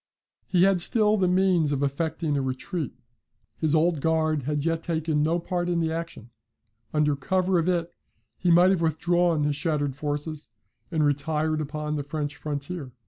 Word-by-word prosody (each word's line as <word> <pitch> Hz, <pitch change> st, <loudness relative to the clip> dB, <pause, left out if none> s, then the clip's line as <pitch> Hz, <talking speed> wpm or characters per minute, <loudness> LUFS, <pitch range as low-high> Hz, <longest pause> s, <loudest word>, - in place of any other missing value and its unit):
He 180 Hz, -1 st, +3 dB
had 195 Hz, -2 st, +4 dB
still 215 Hz, +2 st, +4 dB
the 190 Hz, -3 st, +2 dB
means 180 Hz, -4 st, +2 dB
of 140 Hz, -1 st, 0 dB
effecting 155 Hz, +2 st, -1 dB
a 140 Hz, -, +1 dB
retreat. 135 Hz, +5 st, -4 dB, 0.6 s
His 160 Hz, -1 st, +2 dB
Old 160 Hz, -1 st, +2 dB
Guard 155 Hz, -1 st, +1 dB
had 150 Hz, 0 st, -1 dB
yet 165 Hz, -1 st, 0 dB
taken 160 Hz, -3 st, -1 dB
no 160 Hz, +3 st, +2 dB
part 175 Hz, 0 st, -2 dB
in 175 Hz, -, 0 dB
the 160 Hz, -1 st, 0 dB
action. 165 Hz, -8 st, -6 dB, 0.6 s
Under 150 Hz, -1 st, +2 dB
cover 185 Hz, +6 st, +1 dB
of 165 Hz, +2 st, 0 dB
it, 175 Hz, -1 st, -1 dB, 0.5 s
he 180 Hz, -, +1 dB
might 175 Hz, +2 st, +6 dB
have 185 Hz, -3 st, +1 dB
withdrawn 170 Hz, 0 st, +1 dB
his 145 Hz, 0 st, 0 dB
shattered 145 Hz, -2 st, -1 dB
forces 150 Hz, +1 st, -4 dB, 0.4 s
and 155 Hz, -3 st, +1 dB
retired 155 Hz, +2 st, 0 dB
upon 150 Hz, 0 st, -3 dB
the 145 Hz, -, -3 dB
French 145 Hz, 0 st, -4 dB
frontier. 145 Hz, -1 st, -5 dB
160 Hz, 170 wpm, -26 LUFS, 150-175 Hz, 0.6 s, might